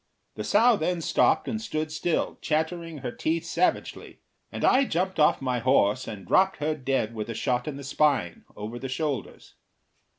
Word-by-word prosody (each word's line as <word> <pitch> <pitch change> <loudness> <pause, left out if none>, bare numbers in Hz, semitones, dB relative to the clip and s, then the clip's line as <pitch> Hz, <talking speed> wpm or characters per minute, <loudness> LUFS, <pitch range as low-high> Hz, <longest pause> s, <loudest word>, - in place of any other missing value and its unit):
The - - -5
sow 230 +2 +4
then 175 +1 -1
stopped 165 - +2
and 220 -1 -2
stood 155 -7 -3
still, 160 +1 -1
chattering 160 +1 -2
her 125 - -4
teeth 165 +5 -2
savagely, 170 +2 -1 0.3
and - - -2
I 265 - +5
jumped 185 - -1
off 150 -2 +3
my 125 -2 0
horse 130 -1 +2
and 105 -4 -7
dropped 190 0 +3
her 150 +2 -1
dead 135 -6 -1
with 110 0 -5
a 115 - -4
shot 125 +2 -1
in 145 -2 -4
the 140 - -8
spine, 135 - 0
over 110 +4 -6
the 135 +1 -5
shoulders. 140 -4 -4
150 Hz, 175 wpm, -26 LUFS, 125-170 Hz, 0.3 s, I